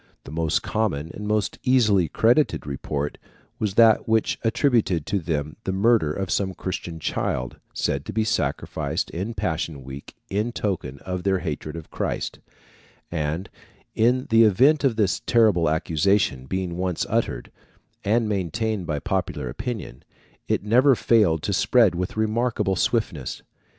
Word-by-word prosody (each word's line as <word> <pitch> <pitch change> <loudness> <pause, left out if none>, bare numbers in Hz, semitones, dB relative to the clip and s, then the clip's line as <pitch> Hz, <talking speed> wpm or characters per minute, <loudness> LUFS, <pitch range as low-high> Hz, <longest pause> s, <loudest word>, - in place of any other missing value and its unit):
The - - -10
most 80 0 0
common, 85 -8 -1
and 105 +1 -6
most 105 -3 0
easily 110 -9 +3
credited 120 - +2
report, 70 +1 -4 0.4
was 105 -3 -1
that 115 0 +5
which 110 -1 +1
attributed 115 - +2
to 100 - 0
them 75 -3 -3
the 95 - -2
murder 100 -4 +3
of 95 +3 -3
some 95 -2 0
Christian 85 -3 -5
child, 65 -4 -2 0.2
said 70 0 -1
to - - -5
be 110 +2 +1
sacrificed 110 - -2
in 100 +7 -4
Passion 80 -4 -2
week 65 +2 -10
in 105 +5 -1
token 90 - -3
of 90 -1 -3
their 95 +1 +1
hatred 80 -3 -4
of 80 -2 -9
Christ; - - -3 0.7
and 80 +3 -2 0.5
in 125 +3 +2
the 115 0 +6
event 130 +8 +5
of 130 -5 +2
this 105 -4 +1
terrible 105 -9 +4
accusation 80 -3 +1
being 90 +1 -3
once 90 -2 -1
uttered, - - -1 0.5
and 110 +2 +2
maintained 105 0 -2
by 75 - -1
popular 70 -2 -2
opinion, 70 - -6 0.4
it - - 0
never 125 +6 +5
failed 100 -11 +3
to 100 - -1
spread 115 +1 +4
with 90 +4 -4
remarkable 110 -2 0
swiftness. 85 - -1
95 Hz, 145 wpm, -24 LUFS, 80-110 Hz, 0.7 s, the